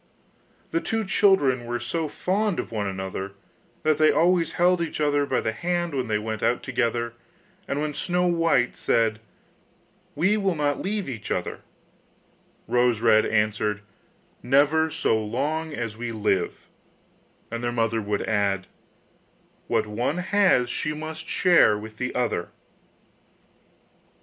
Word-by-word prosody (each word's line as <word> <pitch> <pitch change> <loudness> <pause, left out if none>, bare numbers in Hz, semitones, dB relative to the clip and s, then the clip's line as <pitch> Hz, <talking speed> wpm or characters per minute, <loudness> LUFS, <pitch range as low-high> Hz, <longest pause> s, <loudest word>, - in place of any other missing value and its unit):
The 165 - 0
two 225 -1 -2
children 190 - +3
were 120 0 -2
so 155 +7 -2
fond 195 +5 -1
of - - -4
one 105 -3 -2
another 95 0 -5 0.5
that 155 -1 +2
they 155 0 +6
always 170 -1 +2
held 180 0 +3
each 165 - -3
other 145 -1 +2
by - - +1
the 110 - -1
hand 175 +5 -2
when 130 -3 -1
they 105 -1 +1
went 110 0 -4
out 120 +2 +1
together, 120 -2 -1 0.5
and 140 - -2
when 150 0 -2
Snow 180 +3 0
white 165 -8 +2
said: 110 -1 +1 1.0
'We 205 +5 +2
will 195 -4 0
not 145 -1 0
leave 205 0 -2
each 115 -6 -6
other,' - - -3 1.1
Rose 120 -2 +2
red 110 -1 +4
answered: 105 -1 0 0.6
'Never 145 +5 +3
so 110 -7 0
long 150 +9 -2
as 115 -6 -4
we 120 0 -4
live,' 105 -5 -1 0.9
and 115 0 -4
their 120 - 0
mother 115 -1 0
would 105 -1 -2
add: 100 -3 0 1.0
'What - - +1
one 120 +9 -2
has 185 -8 +3
she 155 - -2
must 160 +1 -7
share 175 - +4
with 110 +1 -9
the 125 +1 -3
other. 125 -1 -1
130 Hz, 140 wpm, -25 LUFS, 110-165 Hz, 1.1 s, they